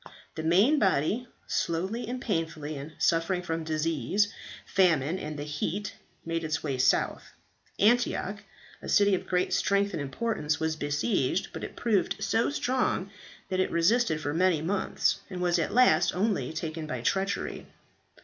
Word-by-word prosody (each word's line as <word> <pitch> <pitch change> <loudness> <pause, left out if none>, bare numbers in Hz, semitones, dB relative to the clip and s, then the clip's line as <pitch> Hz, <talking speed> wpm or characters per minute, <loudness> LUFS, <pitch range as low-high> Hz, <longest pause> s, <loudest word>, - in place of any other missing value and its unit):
"The - - -5
main 195 - +4
body, 195 - +1 0.2
slowly 190 +9 -2
and 250 +2 -3
painfully, 160 -8 -3
and 145 +3 -8
suffering 170 +2 +1
from 165 -1 -3
disease, 160 - 0 0.3
famine, 170 -2 +2
and 150 0 -5
the 145 - -4
heat, 160 +7 -3 0.3
made 165 0 -2
its 155 0 -2
way 135 -4 -2
south. 130 0 +2 0.5
Antioch, 210 -2 +2 0.4
a - - -7
city 205 -1 +4
of 185 - -1
great 180 0 0
strength 200 0 +2
and 165 - -2
importance, 155 - -2
was 160 0 0
besieged, 145 - 0
but - - -6
it - - -6
proved 220 -5 +1
so 225 - +1
strong 255 -8 0 0.4
that 185 - -1
it 185 - +2
resisted 170 0 +2
for 145 -1 -3
many 180 -1 +3
months, 185 +6 0
and 185 -2 -6
was 175 -1 +2
at 165 - -1
last 175 -10 +4
only 190 - 0
taken 160 0 -4
by 130 -5 -4
treachery. 195 +9 -1
175 Hz, 155 wpm, -28 LUFS, 155-200 Hz, 0.5 s, main